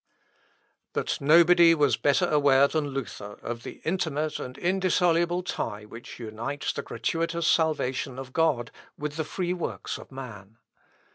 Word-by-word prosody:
But -, -, -1 dB
nobody 170 Hz, +3 st, +6 dB
was 145 Hz, -3 st, +3 dB
better 140 Hz, -2 st, +2 dB
aware 140 Hz, -2 st, +5 dB
than 155 Hz, 0 st, -1 dB
Luther 120 Hz, -6 st, -6 dB
of 115 Hz, 0 st, -4 dB
the -, -, -9 dB
intimate 155 Hz, -3 st, -1 dB
and 125 Hz, +1 st, -7 dB
indissoluble 175 Hz, -1 st, +2 dB
tie 105 Hz, -, -4 dB
which 115 Hz, +2 st, -10 dB
unites 115 Hz, +5 st, -4 dB
the -, -, -3 dB
gratuitous 165 Hz, +7 st, -2 dB
salvation 140 Hz, -6 st, +1 dB
of 130 Hz, -1 st, -8 dB
God 150 Hz, -8 st, +1 dB, 0.3 s
with 150 Hz, 0 st, -4 dB
the 160 Hz, -, -1 dB
free 175 Hz, +3 st, -2 dB
works 180 Hz, -, -4 dB
of -, -, -13 dB
man. 110 Hz, -6 st, -9 dB
145 Hz, 140 wpm, -27 LUFS, 125-165 Hz, 0.3 s, nobody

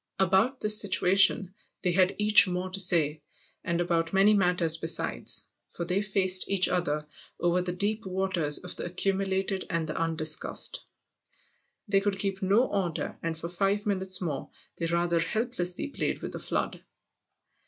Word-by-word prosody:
About 195 Hz, +8 st, +1 dB
this 210 Hz, 0 st, +4 dB
situation 195 Hz, -1 st, +2 dB, 0.3 s
they 180 Hz, -, +1 dB
had 185 Hz, +1 st, +2 dB
each 210 Hz, -1 st, +6 dB
more 180 Hz, +1 st, -4 dB
to 195 Hz, -, -2 dB
say, 160 Hz, -5 st, +3 dB, 0.4 s
and 170 Hz, 0 st, -2 dB
about 170 Hz, -1 st, -1 dB
many 195 Hz, +2 st, +4 dB
matters 180 Hz, -5 st, +2 dB
besides, 160 Hz, -, +2 dB, 0.2 s
for 170 Hz, -, -6 dB
they 185 Hz, +3 st, -1 dB
faced 190 Hz, -2 st, +2 dB
each 195 Hz, -2 st, +2 dB
other 150 Hz, -4 st, -2 dB, 0.3 s
over 175 Hz, +1 st, +1 dB
the 180 Hz, 0 st, -3 dB
deep 205 Hz, +3 st, -2 dB
waters 185 Hz, -5 st, 0 dB
of 180 Hz, -, -6 dB
the -, -, -5 dB
accumulated 190 Hz, +1 st, -2 dB
and 165 Hz, -3 st, -2 dB
the 155 Hz, -, -5 dB
undiscussed. 160 Hz, -1 st, 0 dB, 1.1 s
They 200 Hz, -1 st, +2 dB
could 200 Hz, -1 st, -2 dB
keep 195 Hz, 0 st, -3 dB
no 200 Hz, +6 st, +2 dB
order 190 Hz, -8 st, -3 dB
and 165 Hz, -1 st, -4 dB
for 165 Hz, -, -6 dB
five 195 Hz, +4 st, -1 dB
minutes 190 Hz, -2 st, +1 dB
more 155 Hz, -6 st, -4 dB, 0.3 s
they 165 Hz, -, -2 dB
rather 170 Hz, 0 st, 0 dB
helplessly 215 Hz, -, -2 dB
played -, -, -3 dB
with -, -, -5 dB
the -, -, -7 dB
flood. -, -, -4 dB
185 Hz, 155 wpm, -27 LUFS, 170-195 Hz, 1.1 s, each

